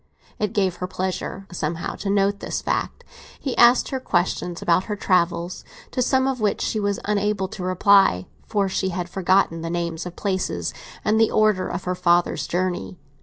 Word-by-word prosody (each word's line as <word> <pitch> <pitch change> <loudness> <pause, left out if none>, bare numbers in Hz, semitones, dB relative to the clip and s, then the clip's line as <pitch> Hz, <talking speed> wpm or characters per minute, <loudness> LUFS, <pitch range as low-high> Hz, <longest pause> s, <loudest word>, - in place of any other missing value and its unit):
It 210 +1 -1
gave 190 -4 +1
her 180 - -3
pleasure, 185 +1 -4
somehow, 165 -1 -3
to 195 - -4
note 200 0 +2
this - - -3
fact. - - -2 0.4
He 265 - -3
asked 240 +1 +5
her 265 - -2
questions 175 -5 -1
about 175 +2 +2
her 210 - -3
travels, 180 -2 0 0.3
to 255 - -1
some 260 +1 +2
of 260 -3 -2
which 210 -2 +1
she 215 - -1
was 200 -1 -1
unable 205 -1 0
to 210 - -8
reply, 185 - +4 0.2
for 205 -3 +1
she 190 0 -1
had 175 -1 -3
forgotten 185 -2 +1
the 165 - -4
names 170 0 -3
of 175 - -9
places, 190 -2 -2 0.3
and 220 +1 +3
the 225 - +4
order 215 -4 +2
of 175 +1 -4
her 180 - -1
father's 175 -1 +2
journey. 175 - -2
190 Hz, 180 wpm, -23 LUFS, 175-205 Hz, 0.4 s, asked